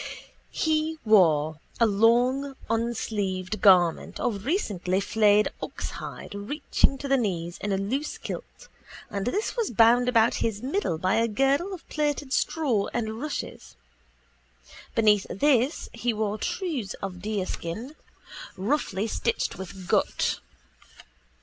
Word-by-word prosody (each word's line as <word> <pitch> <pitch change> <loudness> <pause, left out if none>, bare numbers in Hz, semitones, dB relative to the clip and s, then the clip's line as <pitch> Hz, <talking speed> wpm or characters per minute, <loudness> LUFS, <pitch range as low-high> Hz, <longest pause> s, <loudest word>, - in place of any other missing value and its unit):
He 315 0 0
wore 160 -7 +4 0.2
a 230 - +6
long 245 +6 +3 0.2
unsleeved 215 -4 -2
garment 180 -5 +4
of 210 -4 -2
recently 200 - 0
flayed 210 0 +3
oxhide - - -6
reaching 275 +6 0
to 280 - -5
the 275 0 +3
knees 175 -7 -2
in 205 - -2
a 195 - +1
loose 255 +10 -2
kilt - - -8 0.4
and 200 +1 -3
this 410 - -1
was 465 -3 0
bound 240 +2 +5
about 230 -2 +4
his 220 -1 -1
middle 275 - -1
by 185 +5 +1
a 230 +1 +3
girdle 270 - +1
of 370 -4 -8
plaited 290 -3 -1
straw 255 -11 +1
and 220 -1 -2
rushes. 300 - -5 1.2
Beneath 210 -3 +4
this 265 +4 +2
he 235 0 -1
wore 215 0 -2
trews 295 - -3
of 180 -2 -5
deerskin, 210 - -4 0.6
roughly 205 -2 -1
stitched 225 -4 -1
with 190 -1 -8
gut. - - +1
225 Hz, 125 wpm, -26 LUFS, 195-270 Hz, 1.2 s, a